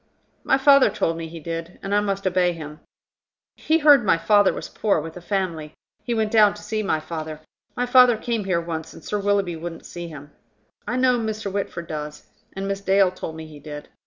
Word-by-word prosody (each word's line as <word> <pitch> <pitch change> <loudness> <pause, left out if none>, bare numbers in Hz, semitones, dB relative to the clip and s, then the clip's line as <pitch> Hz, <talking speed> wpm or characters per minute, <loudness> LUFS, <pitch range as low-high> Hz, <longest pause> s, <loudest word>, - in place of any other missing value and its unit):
"My 265 - +3
father 275 0 +6
told 165 - -1
me 165 0 -5
he 165 +1 -9
did, 165 +2 -6
and 195 - -3
I 205 - +4
must 200 -1 -2
obey 180 -1 +2
him. 150 -2 -9 0.8
He 320 - +1
heard 290 -5 +6
my 190 - +3
father 205 +3 +4
was - - -6
poor, 205 -6 0
with 160 +1 -7
a 180 - -9
family. 170 -5 -3 0.3
He 240 - -2
went 220 -1 0
down 210 -2 +5
to 210 - -12
see 215 +1 -2
my 175 -6 0
father. 155 -1 -6 0.4
My 245 - +1
father 250 -2 +6
came 225 -2 -2
here 180 -3 +1
once, 165 -1 -6
and - - -13
Sir 210 - -2
Willoughby 200 -3 0
wouldn't 165 0 -7
see 175 -1 -7
him. 145 -2 -11 0.6
I 250 - -1
know 255 -1 +3
Mr. 220 -2 -3
Whitford 195 -4 -3
does. 150 -1 -6 0.3
And 195 +1 -4
Miss 195 0 -3
Dale 195 -1 +3
told 170 -3 -7
me 160 0 -8
he 155 -2 -12
did. 145 0 -9
190 Hz, 215 wpm, -23 LUFS, 165-215 Hz, 0.8 s, father